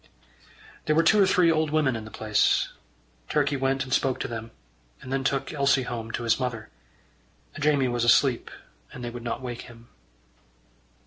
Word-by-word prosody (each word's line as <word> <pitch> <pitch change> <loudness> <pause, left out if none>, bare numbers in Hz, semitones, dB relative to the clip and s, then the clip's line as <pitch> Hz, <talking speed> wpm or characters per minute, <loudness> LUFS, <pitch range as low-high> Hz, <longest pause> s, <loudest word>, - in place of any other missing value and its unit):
There 155 - +2
were 165 - +4
two 210 +5 +5
or 195 - +5
three 180 -3 +4
old 155 -1 +1
women 150 -4 +1
in 110 -1 -6
the - - -9
place. 110 -1 +1 0.6
Turkey 145 -1 +1
went 135 0 0
and 130 -1 -5
spoke 135 -2 +1
to - - -2
them, 115 -1 -6 0.5
and 130 - -7
then 135 0 0
took 140 +2 -1
Elsie 140 -2 +2
home 115 -2 -5
to - - -3
his 115 +1 +2
mother. 120 -4 -4 0.9
Jamie 145 -3 +2
was 120 -1 -1
asleep, 120 +1 +3 0.4
and 125 - -9
they 120 - -4
would 120 0 -8
not 120 +1 -4
wake 120 -1 -5
him. 120 0 -16
130 Hz, 180 wpm, -26 LUFS, 120-145 Hz, 0.9 s, two